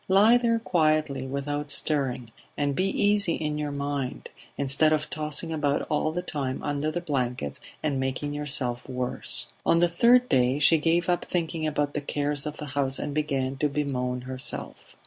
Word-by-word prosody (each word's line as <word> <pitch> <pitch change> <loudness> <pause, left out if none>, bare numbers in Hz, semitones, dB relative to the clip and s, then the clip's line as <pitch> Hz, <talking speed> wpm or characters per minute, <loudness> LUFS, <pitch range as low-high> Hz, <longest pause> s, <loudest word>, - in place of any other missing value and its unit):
Lie 210 +5 +6
there 230 -1 +2
quietly, 155 - +1
without 145 +2 -3
stirring; 130 -7 +3 0.3
and 145 -1 0
be 185 - +1
easy 205 -4 +2
in 150 -1 -3
your 150 -1 -2
mind, 140 -2 -4 0.3
instead 140 +3 +3
of 155 -1 0
tossing 155 +2 -1
about 145 -2 0
all 155 +1 +1
the 175 +2 -3
time 135 -6 -3
under 145 +1 -1
the 175 +2 -3
blankets 125 - -2 0.2
and 145 -3 0
making 135 +2 -2
yourself 140 -4 -1
worse...." 125 -1 -2 0.2
On 165 - +3
the 175 +1 +4
third 240 +8 +4
day 130 - +2
she 155 +2 +5
gave 165 +2 +1
up 175 -1 0
thinking 165 -2 -2
about 145 -1 -1
the 150 - -2
cares 145 0 -1
of 150 - -6
the 150 - -6
house 135 -2 +1
and 145 - -4
began 135 -3 -1
to 150 +1 +1
bemoan 125 -4 -2
herself. 130 0 -6
145 Hz, 175 wpm, -26 LUFS, 135-160 Hz, 0.3 s, Lie